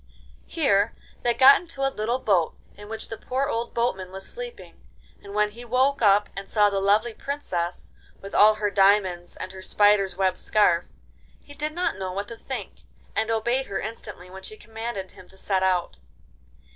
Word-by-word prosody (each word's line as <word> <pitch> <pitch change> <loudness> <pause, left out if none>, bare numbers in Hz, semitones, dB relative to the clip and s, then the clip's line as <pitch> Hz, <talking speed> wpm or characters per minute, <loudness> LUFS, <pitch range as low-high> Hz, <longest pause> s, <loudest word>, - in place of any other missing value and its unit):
Here 220 - +2 0.3
they 240 -1 +1
got 270 +1 +8
into 330 -6 -4
a 270 - -3
little 225 +4 -1
boat 190 -10 +1 0.2
in 205 +1 -12
which 225 0 -5
the 225 - -7
poor 260 +2 -1
old 235 -3 -3
boatman 195 -6 -1
was 195 0 -7
sleeping, 485 0 -9 0.4
and 200 0 -10
when 210 0 +2
he 235 +3 -10
woke 260 +3 +1
up 205 -1 +5
and 195 0 -7
saw 210 -2 +4
the 195 - 0
lovely 210 +4 +2
Princess, 185 -12 -4 0.3
with 195 - -10
all 215 +1 +6
her 210 -1 -1
diamonds 195 -3 +3
and 185 - -6
her 190 0 -10
spiders'—web 195 -2 +2
scarf, 175 -5 +2 0.6
he 290 - -13
did 305 +1 -4
not 350 - -1
know 190 -1 -3
what 200 +2 -4
to 230 - -7
think, - - -7 0.4
and 220 0 0
obeyed 235 +4 0
her 195 - -3
instantly 210 -4 -8
when 190 +1 -10
she 215 +3 -8
commanded 225 -3 -6
him 180 - -16
to 190 - -17
set 190 0 0
out. 185 -2 0
210 Hz, 185 wpm, -25 LUFS, 195-240 Hz, 0.6 s, got